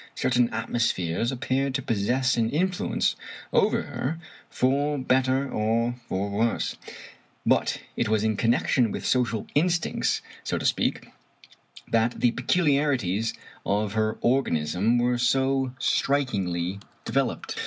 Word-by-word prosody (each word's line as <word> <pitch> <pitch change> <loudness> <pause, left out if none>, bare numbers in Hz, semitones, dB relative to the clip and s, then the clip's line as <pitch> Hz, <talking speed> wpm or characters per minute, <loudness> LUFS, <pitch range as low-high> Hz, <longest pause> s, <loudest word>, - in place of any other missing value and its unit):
Certain 125 -1 +2
atmospheres 110 -1 -1
ap 130 - -6
peared 135 0 0
to 135 - 0
possess 125 +5 +1
an 115 -1 +1
influence 180 +6 0 0.4
over - - +3
her 150 +6 -3 0.3
for 145 +3 +1
better 130 +1 +1
or 115 0 0 0.2
for 95 +2 -1
worse; 115 +3 0 0.7
but - - +2 0.2
it 120 - 0
was 110 -1 +2
in 110 -1 +1
connection 115 +1 +2
with - - -5
social 120 -4 +1
instincts, 170 +2 +1 0.2
so - - -1
to - - -4
speak, - - 0 0.8
that 115 +1 +1
the 120 - +3
peculiarities 130 - +1 0.3
of 105 0 0
her 110 0 0
organism 110 - +1
were 120 0 +1
so 135 +1 +1
strikingly 100 -11 0 0.3
developed. - - -1
120 Hz, 120 wpm, -26 LUFS, 110-135 Hz, 0.8 s, over